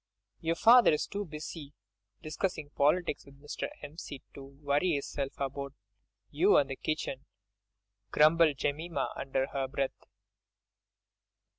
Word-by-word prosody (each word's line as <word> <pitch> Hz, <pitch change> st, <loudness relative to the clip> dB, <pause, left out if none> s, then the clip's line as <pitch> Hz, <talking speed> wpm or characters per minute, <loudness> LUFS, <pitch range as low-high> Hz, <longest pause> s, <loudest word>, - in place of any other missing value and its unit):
"Your 165 Hz, 0 st, 0 dB
father 235 Hz, +5 st, +7 dB
is 150 Hz, -, 0 dB
too 205 Hz, +1 st, -4 dB
busy 150 Hz, -2 st, -8 dB, 0.5 s
discussing 155 Hz, -1 st, -3 dB
politics 155 Hz, +3 st, +1 dB
with 140 Hz, 0 st, -17 dB
Mr. 145 Hz, +1 st, -4 dB, 0.2 s
'Empseed 145 Hz, -2 st, -8 dB
to 140 Hz, -, -9 dB
worry 145 Hz, +4 st, 0 dB
'isself 140 Hz, 0 st, -4 dB
about 140 Hz, 0 st, -4 dB, 0.6 s
you -, -, +4 dB
and 140 Hz, -2 st, +2 dB
the -, -, -2 dB
kitchen," 140 Hz, -2 st, -3 dB, 0.8 s
grumbled 155 Hz, +2 st, +5 dB
Jemima 145 Hz, +1 st, -2 dB
under 135 Hz, -1 st, -1 dB
her 135 Hz, -1 st, -1 dB
breath. 135 Hz, 0 st, -3 dB
145 Hz, 120 wpm, -31 LUFS, 140-160 Hz, 0.8 s, father